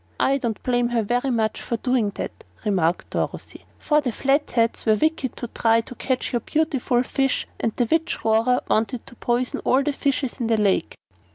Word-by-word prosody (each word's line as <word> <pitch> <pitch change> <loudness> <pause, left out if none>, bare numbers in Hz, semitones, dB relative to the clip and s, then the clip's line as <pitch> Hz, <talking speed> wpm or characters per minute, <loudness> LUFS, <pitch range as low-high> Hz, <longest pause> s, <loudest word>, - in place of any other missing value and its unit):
"I 275 +1 +3
don't 230 -4 -3
blame 245 -1 +2
her 240 -2 0
very 245 +5 0
much 225 -3 0
for 235 - -2
doing 250 -3 +1
that," - - -6 0.2
remarked 180 -4 0
Dorothy, - - -4
"for 300 -1 +2
the 255 -4 -1
Flatheads 265 -3 +1
were 220 -1 +4
wicked 310 0 0
to 240 - -4
try 230 0 +2
to 240 - -10
catch 255 +1 -2
your 240 - +2
beautiful 265 -3 0
fish 270 +1 0
and 225 - 0
the 245 - +2
Witch 325 +7 -1
Rora 225 +3 +3
wanted 225 +2 0
to - - -14
poison 240 +1 -1
all 265 +2 +3
the 295 - 0
fishes 275 -2 -1
in 235 - -1
the 225 -1 +2
lake." 205 -3 +1
245 Hz, 190 wpm, -23 LUFS, 225-270 Hz, 0.2 s, were